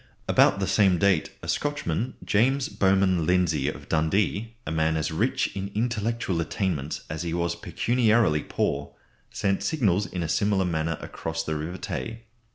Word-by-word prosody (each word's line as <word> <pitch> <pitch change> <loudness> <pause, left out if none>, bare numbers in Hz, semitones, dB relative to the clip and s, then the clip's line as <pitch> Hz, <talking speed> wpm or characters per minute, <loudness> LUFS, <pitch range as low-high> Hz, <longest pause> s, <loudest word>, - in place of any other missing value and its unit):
About 100 - +4
the 95 - 0
same 95 -1 +3
date 95 -3 +2
a - - -6
Scotchman, 125 - -1
James 130 +6 +2
Bowman 95 -4 +2
Lindsay 85 -6 +2
of - - -8
Dundee, 100 +8 0
a - - -3
man 80 0 +1
as 80 +1 -1
rich 80 - 0
in 100 0 -3
intellectual 115 -5 -1
attainments 80 -5 -2
as 75 0 -4
he 85 -1 -2
was 85 0 0
pecuniarily 115 -9 +2
poor, - - -2 0.3
sent 100 -1 -1
signals 100 - +1
in 90 -2 -4
a - - -2
similar 100 +3 +1
manner 80 -1 -1
across 80 0 -4
the 80 - -2
River 80 +4 -4
Tay. 115 +5 -5
95 Hz, 160 wpm, -26 LUFS, 80-105 Hz, 0.3 s, About